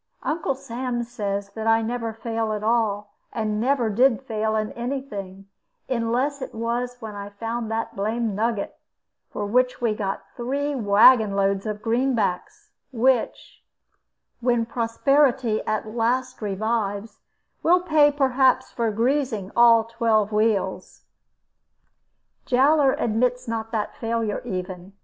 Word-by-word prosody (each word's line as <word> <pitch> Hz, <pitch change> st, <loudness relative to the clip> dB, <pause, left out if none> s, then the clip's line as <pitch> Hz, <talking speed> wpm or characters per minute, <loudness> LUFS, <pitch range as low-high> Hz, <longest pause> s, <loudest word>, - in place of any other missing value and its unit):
Uncle 315 Hz, -3 st, -1 dB
Sam 245 Hz, -1 st, -4 dB
says 200 Hz, -4 st, -4 dB
that 220 Hz, +2 st, -5 dB
I 225 Hz, 0 st, +4 dB
never 230 Hz, 0 st, -3 dB
fail 225 Hz, 0 st, -3 dB
at 210 Hz, 0 st, -4 dB
all, 215 Hz, -2 st, 0 dB, 0.2 s
and 215 Hz, -1 st, -2 dB
never 255 Hz, -1 st, +1 dB
did 245 Hz, +4 st, +2 dB
fail 220 Hz, -3 st, -1 dB
in 215 Hz, 0 st, -1 dB
any 250 Hz, +3 st, -3 dB
thing, 195 Hz, -7 st, -8 dB, 0.4 s
unless 255 Hz, +4 st, -1 dB
it 260 Hz, -, -7 dB
was 240 Hz, +2 st, -2 dB
when 220 Hz, -3 st, -7 dB
I 200 Hz, 0 st, -7 dB
found 225 Hz, +2 st, -4 dB
that 225 Hz, 0 st, -3 dB
blamed 220 Hz, +2 st, -1 dB
nugget, 220 Hz, 0 st, -2 dB, 0.5 s
for 210 Hz, -, -4 dB
which 250 Hz, +4 st, +1 dB
we 235 Hz, -3 st, +1 dB
got 195 Hz, -2 st, -3 dB
three 280 Hz, +4 st, -2 dB
wagon 215 Hz, -2 st, +5 dB
loads 195 Hz, +1 st, 0 dB
of 210 Hz, 0 st, -5 dB
greenbacks; 245 Hz, -, -1 dB, 0.2 s
which 250 Hz, 0 st, 0 dB, 0.8 s
(when 240 Hz, -1 st, +1 dB
prosperity 240 Hz, +1 st, +1 dB
at 215 Hz, 0 st, -1 dB
last 250 Hz, +2 st, 0 dB
revives) 205 Hz, 0 st, -2 dB, 0.4 s
will 355 Hz, +2 st, +4 dB
pay 310 Hz, -4 st, +4 dB
perhaps 265 Hz, -2 st, +2 dB
for 230 Hz, -2 st, -1 dB
greasing 230 Hz, -3 st, -1 dB
all 235 Hz, -1 st, +6 dB
twelve 225 Hz, -2 st, +1 dB
wheels. 210 Hz, -3 st, -1 dB, 1.4 s
Jowler 275 Hz, +2 st, +4 dB
admits 245 Hz, +3 st, 0 dB
not 225 Hz, -1 st, -3 dB
that 215 Hz, -3 st, -2 dB
failure 230 Hz, -4 st, -2 dB
even. 185 Hz, -3 st, -6 dB
230 Hz, 130 wpm, -24 LUFS, 215-250 Hz, 1.4 s, all